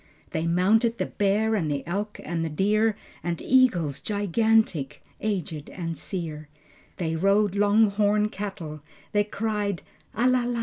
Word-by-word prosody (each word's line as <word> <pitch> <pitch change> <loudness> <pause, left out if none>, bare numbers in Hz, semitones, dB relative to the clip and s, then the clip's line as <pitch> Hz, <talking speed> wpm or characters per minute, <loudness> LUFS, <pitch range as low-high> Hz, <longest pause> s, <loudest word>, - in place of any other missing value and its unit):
They 160 +1 -1
mounted 215 +7 +3
the - - 0
bear 210 +2 +1
and 175 -8 0
the 140 -2 -2
elk 205 +5 -3
and 170 -1 -2
the 165 - -2
deer, 210 +7 +2 0.3
And 170 0 -2
eagles 185 - +3
gigantic, 205 -6 +1 0.2
aged 175 -8 -3
and 165 -3 -4
sere, 155 -4 -5 0.5
They 165 -2 -1
rode 195 +3 +3
long 205 +1 +4
horn 210 +1 +2
cattle, 175 -8 -6 0.3
they 205 0 +3
cried 210 -3 -2 0.3
"A 240 +3 +3
la 255 -1 +3
la." 240 -1 -1
200 Hz, 145 wpm, -26 LUFS, 165-215 Hz, 0.5 s, long